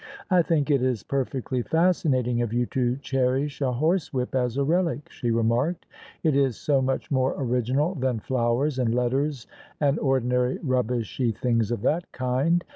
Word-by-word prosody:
" - - -14
I 180 -1 +6
think 155 -3 +1
it 140 -3 +3
is 125 -4 0
perfectly 130 -2 -2
fascinating 135 -7 +1
of 120 -3 -2
you 120 +1 +1
to 125 -1 +1
cherish 135 +2 0
a 130 -2 +1
horsewhip 145 -2 0
as 125 -1 0
a 140 - +2
relic," 165 -2 0
she 120 - -3
remarked: 115 +9 +1 0.4
"it 155 -3 +2
is 135 -5 +2
so 140 -3 +1
much 130 +2 -2
more 130 -1 +1
original 130 +5 0
than 130 -6 -1
flowers 125 +4 0
and 120 -2 +1
letters 130 +2 0 0.3
and 145 0 +2
ordinary 125 -2 +1
rubbishy 125 -2 0
things 115 -1 0
of 120 -4 -3
that 170 +3 0
kind. 130 +7 +1
130 Hz, 165 wpm, -25 LUFS, 125-145 Hz, 0.4 s, I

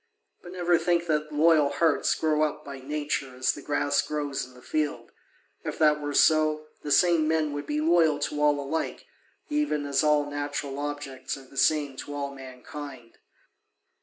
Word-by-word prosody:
But 175 - -11
never 175 -2 +2
think 175 -1 +1
that 155 -2 -1
loyal 155 -1 +4
hearts 150 +2 +2
grow 155 -1 +1
up 150 0 -1
by 140 -1 -7
nature 140 -1 -3
as 130 0 +1
the 145 - -9
grass 145 0 +1
grows 145 -2 -3
in 130 - -18
the 125 - -15
field: 150 -1 -2 0.5
if - - -4
that 150 -1 +3
were 145 -1 -3
so, 155 -1 +4 0.2
the 150 - -6
same 165 0 +4
men 155 -2 +1
would 145 0 -5
be 150 +1 -1
loyal 160 -2 +4
to 150 0 -2
all 145 -1 +3
alike, 145 +3 -3 0.4
even 295 - 0
as 140 +1 +1
all 150 -1 +3
natural 145 -1 -4
objects 145 -3 -4
are 135 - -13
the 130 - -18
same 145 -1 +2
to 145 - -6
all 140 -1 -3
mankind. 130 -1 -10
150 Hz, 175 wpm, -27 LUFS, 140-155 Hz, 0.5 s, loyal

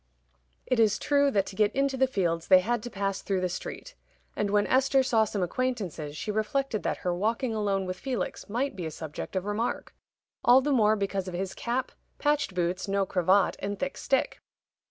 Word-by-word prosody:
It 255 - +1
is 210 -2 +4
true 285 -1 +3
that 200 -7 +1
to 190 - -9
get 210 +1 +3
into 275 0 +1
the 265 0 +3
fields 170 -8 -1
they 185 -1 +7
had 240 +3 -1
to 240 - -6
pass 195 -2 -2
through 195 -2 -1
the 185 - +1
street; - - -7 0.4
and 205 - -1
when 205 0 +3
Esther 265 +1 +3
saw 225 -4 +3
some 205 -3 -2
acquaintances, 180 - -3
she 215 - -3
reflected 220 +2 -1
that - - -1
her 180 - +1
walking 225 +6 -1
alone 200 -3 0
with 185 0 -5
Felix 255 -4 -4
might 245 +3 -1
be 175 -4 -4
a - - -3
subject 155 +3 -7
of 185 0 -1
remark 210 +3 -2 0.5
all 245 +2 +7
the 290 +2 0
more 215 -5 +4
because 195 -2 -2
of 180 - -5
his 190 +1 -3
cap, 245 +2 -2 0.3
patched 290 -9 0
boots, 180 +2 -1
no 195 0 +1
cravat, 185 +1 +2
and 200 +1 -3
thick 275 +4 -3
stick. 270 - 0
210 Hz, 200 wpm, -28 LUFS, 190-255 Hz, 0.5 s, they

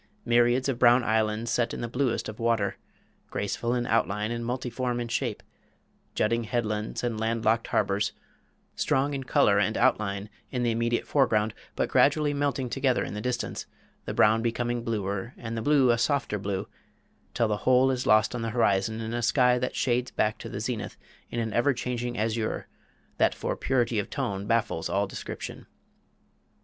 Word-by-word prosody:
Myriads 120 +2 +3
of 130 -3 -1
brown 120 0 +6
islands 110 0 0
set 120 -1 0
in - - -6
the 120 - -2
bluest 125 0 -1
of 105 - -8
water 115 -3 +1 0.5
graceful 115 +4 -2
in 120 -1 -1
outline 105 -2 0
and 120 0 -3
multiform 125 0 -2
in 120 - -3
shape 115 - -2 0.7
jutting 115 +2 +1
headlands 110 -1 -2
and 115 -3 -1
land 115 +1 -1
locked 115 +1 +2
harbors 100 +1 +1 0.6
strong 140 +2 +1
in 135 -1 -3
color 100 -5 +4
and 105 +2 +1
outline 105 -5 +1 0.2
in 125 -2 -2
the 120 - +2
immediate 115 +1 0
foreground, 110 -6 +2 0.2
but - - 0
gradually 145 +1 +3
melting 140 -2 -1
together 130 +1 +1
in - - -5
the 105 - -4
distance, 125 0 -3 0.4
the - - -3
brown 110 +1 +4
becoming 120 +1 -1
bluer 105 0 -3
and 115 -1 -5
the 115 - -2
blue 135 -1 +4
a 120 - +1
softer 130 -6 0
blue 95 -1 -3 0.7
till 115 -2 +2
the 105 -1 0
whole 130 +4 +4
is 130 -1 -2
lost 110 +2 +4
on 125 - -3
the 115 - -2
horizon 110 -1 +1
in 110 +1 -4
a 120 - -1
sky 125 +1 +3
that 125 - -2
shades 125 0 +1
back 110 0 0
to - - -7
the - - -5
zenith 115 -1 -4 0.3
in 120 - -3
an 110 -2 -2
ever 130 +3 +2
changing 120 0 -3
azure 110 +1 -1 0.5
that - - +3
for - - -2
purity 120 -4 +1
of 100 - -3
tone 100 0 -3
baffles 110 -8 0
all 100 +3 +1
description. 95 - -7
115 Hz, 180 wpm, -27 LUFS, 110-125 Hz, 0.7 s, brown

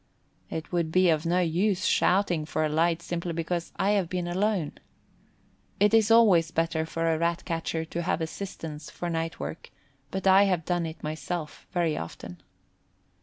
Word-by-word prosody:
It 160 0 -5
would 170 -3 0
be 185 0 +4
of 155 +1 0
no 180 +2 +2
use 185 +3 +1
shouting 180 -4 +2
for 155 0 0
a - - 0
light 165 +2 +1
simply 170 0 -3
because 170 +1 -3
I 200 - +1
have 195 -5 +1
been 180 -1 -2
alone. 190 -2 -1 1.0
It 210 +2 +4
is 220 -1 +5
always 205 -8 +6
better 165 -1 -1
for 165 0 0
a 160 - -1
Rat 170 +1 0
catcher 165 -1 -2
to 170 +1 -4
have 175 - 0
assistance 160 -3 -6
for 175 -1 -4
night 165 0 -3
work, 165 - -6 0.4
but 190 +4 -4
I 195 +1 +7
have 180 -5 0
done 175 -2 0
it 160 - -9
myself 155 +1 -5
very 170 -3 +1
often. 85 +1 -8
170 Hz, 170 wpm, -27 LUFS, 160-185 Hz, 1.0 s, I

